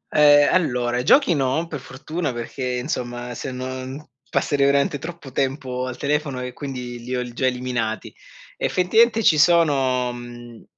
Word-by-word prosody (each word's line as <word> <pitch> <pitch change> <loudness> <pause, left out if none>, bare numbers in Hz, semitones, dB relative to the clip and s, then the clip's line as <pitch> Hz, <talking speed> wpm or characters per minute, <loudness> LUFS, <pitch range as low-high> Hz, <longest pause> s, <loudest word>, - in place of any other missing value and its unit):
Ehm, 145 -1 +6
allora 125 -8 +1
giochi 275 - +5
no, 140 +2 0
per 150 -3 -5
fortuna, 140 +4 -4
perché 120 +3 -6
insomma 125 -2 -4
se 130 +3 -5
non 130 +3 -6 0.2
passerei 140 0 +1
veramente 140 +1 +2
troppo 160 -3 -8
tempo 130 -1 -2
al 130 - -6
telefono 145 -2 -1
e 125 0 -5
quindi 125 -4 -6
li 125 +2 -4
ho 125 - -1
l 125 -1 -6
già 130 +1 0
eliminati. 125 -3 -2 0.4
Effettivamente 220 +5 +3
ci 155 - +5
sono 135 -7 +3
mhmm, 120 -1 -10
130 Hz, 150 wpm, -22 LUFS, 125-150 Hz, 0.4 s, Ehm